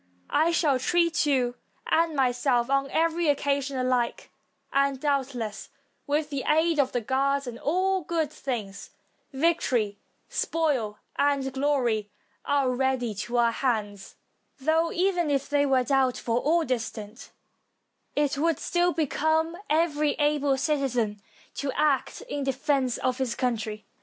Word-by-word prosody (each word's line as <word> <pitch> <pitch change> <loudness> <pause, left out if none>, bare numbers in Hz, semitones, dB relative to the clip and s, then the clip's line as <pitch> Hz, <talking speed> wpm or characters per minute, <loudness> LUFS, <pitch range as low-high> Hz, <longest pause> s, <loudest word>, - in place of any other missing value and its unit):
I 315 +2 +3
shall 305 -6 +2
treat 335 +1 +2
you 255 -4 +2 0.3
and 330 -1 +2
myself 250 -1 +1
on 275 0 +1
every 330 +2 +1
occasion 280 -1 0
alike; 255 -2 -1 0.4
and, 275 -1 +2
doubtless, 265 -7 -2 0.4
with 295 +1 0
the 275 -2 -2
aid 320 +1 +3
of 265 -2 +2
the 245 - -1
gods, 275 +3 0
all 375 +4 +1
good 320 -2 -1
things, 210 -10 -5 0.4
victory, 265 -9 +1 0.3
spoil, 270 -11 -1 0.2
and 280 -2 +1
glory, 255 -7 0 0.4
are 280 -3 +2
ready 250 -3 0
to 225 +4 -3
our 235 -1 +4
hands; 215 -5 -2 0.4
though, 320 +4 +2
even 355 -3 +1
if 275 -1 0
they 285 0 +2
were 260 -2 +3
doubtful 250 -2 +1
or 325 +5 +2
distant, 230 -2 -4 0.9
it 285 -1 +1
would 330 -1 +2
stiU 350 0 0
become 320 +1 +1
every 305 -1 +2
able 290 -2 +1
citizen 250 -8 0 0.3
to 280 -1 -3
act 295 -2 0
in 290 - -4
defense 270 -1 0
of 255 0 -1
his 250 -3 -1
country. 220 -4 -2
275 Hz, 130 wpm, -26 LUFS, 250-305 Hz, 0.9 s, our